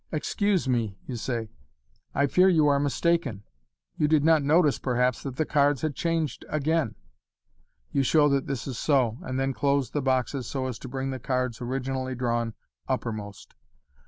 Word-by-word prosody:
Excuse 190 +4 0
me/' 115 -6 0
you 130 - -5
say, 115 -2 -3 0.3
" - - -38
I 140 - +3
fear 180 +7 +4
you 160 -4 +4
are 140 -1 +3
mistaken. 145 - 0 0.6
You 150 - +3
did 155 -1 +3
not 160 -1 +5
notice,, 150 +1 +3
perhaps, 125 -1 +1
that 135 -3 -6
the 155 - 0
cards 145 -3 +2
had 155 -2 0
changed 165 -3 -1
again." 155 -3 0 1.0
You 140 - +2
show 145 +3 +4
that 140 -1 0
this 135 -4 -3
is 130 -4 -5
so, 130 -6 +2
and 130 0 -3
then 135 0 0
close 140 -2 +1
the 145 - -1
boxes 130 -1 0
so 135 -2 -3
as 125 -3 -4
to - - -8
bring 135 +1 -3
the 130 - -4
cards 125 -2 -2
originally 130 +1 -3
drawn 120 -2 -1 0.3
uppermost. 105 -3 -4
135 Hz, 175 wpm, -27 LUFS, 125-150 Hz, 1.0 s, not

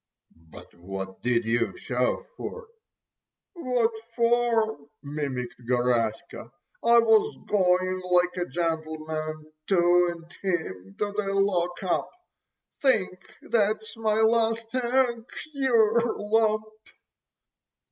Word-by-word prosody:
"But 80 -1 -15
what 95 +2 -7
did 120 -1 +1
you 120 - 0
shove - - -1
for!" 470 -2 -7 0.8
"What 250 - 0 0.2
for——" 235 -4 +2 0.2
mimicked 140 -4 -4
Garaska. 120 +3 0 0.3
"I 235 0 +6
was 225 -2 +4
going——like 180 -2 +2
a 175 - -2
gentleman 155 -1 -3 0.2
to——and 175 -2 +2
him 100 - -3
to——the 205 -1 -2
lock 180 -3 0
up. 180 - 0 0.7
Think 195 -8 +1
that's 215 0 0
my 220 -1 0
last 225 0 +2
egg? 245 -2 +1 0.3
Yer 235 -4 +2
lump!" 215 0 +1
185 Hz, 90 wpm, -26 LUFS, 155-225 Hz, 0.8 s, I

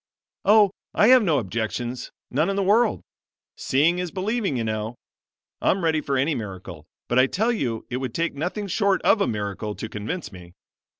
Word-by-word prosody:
"Oh, 210 -2 +6 0.2
I 210 - +5
have 255 -1 +8
no 165 -8 +2
objections, 120 +2 -3 0.2
none 155 +8 +1
in 195 - -1
the 200 - +1
world 215 +4 +3 0.5
seeing 160 +7 +2
is 180 -1 -2
believing, 200 - -1
you 115 - -1
know. 110 +1 -3 0.7
I'm 190 - +1
ready 160 -2 +2
for 140 -2 -1
any 140 +5 +1
miracle; 95 - -7 0.2
but 120 - +2
I 130 - +5
tell 220 - 0
you 120 - -2
it 125 - -1
would 130 -2 -4
take 170 0 0
nothing 175 +8 -3
short 200 0 +1
of 210 - +4
a - - +2
miracle 105 0 -3
to - - -5
convince 110 - -5
me. 90 -2 -13
140 Hz, 185 wpm, -24 LUFS, -, 0.7 s, have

